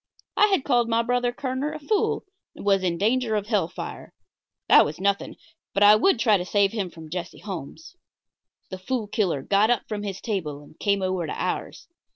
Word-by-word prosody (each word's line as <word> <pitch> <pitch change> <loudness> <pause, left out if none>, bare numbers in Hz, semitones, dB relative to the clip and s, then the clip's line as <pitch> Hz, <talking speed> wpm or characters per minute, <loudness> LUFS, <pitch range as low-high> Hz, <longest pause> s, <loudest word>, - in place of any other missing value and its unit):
I 420 - +5
had 385 -9 +1
called 240 -4 +2
my 230 0 +2
brother 245 0 +1
Kerner 260 +4 -3
a 310 - -6
fool 400 +8 0 0.3
and - - -10
was 195 -1 +3
in 175 -2 0
danger 225 +3 +1
of 205 -1 -1
hell 210 -7 +1
fire. - - -8 0.5
That - - +8
was 150 +2 -5
nothing; 200 +1 0 0.4
but 200 - +4
I 205 +1 +9
would 260 - +3
try 220 -3 +4
to 180 - -3
save 200 +1 +2
him 205 -5 -3
from 160 -2 -12
Jesse 175 0 -5
Holmes. 195 - -8 0.8
The 185 - -6
Fool 225 +4 -2
Killer 190 -9 -1
got 205 +6 +3
up 245 -2 +2
from 210 -1 -4
his 195 -2 -5
table 155 -10 -4
and 150 - -19
came 200 -1 +1
over 185 -3 -1
to - - -4
ours. - - -4
205 Hz, 200 wpm, -25 LUFS, 185-240 Hz, 0.8 s, I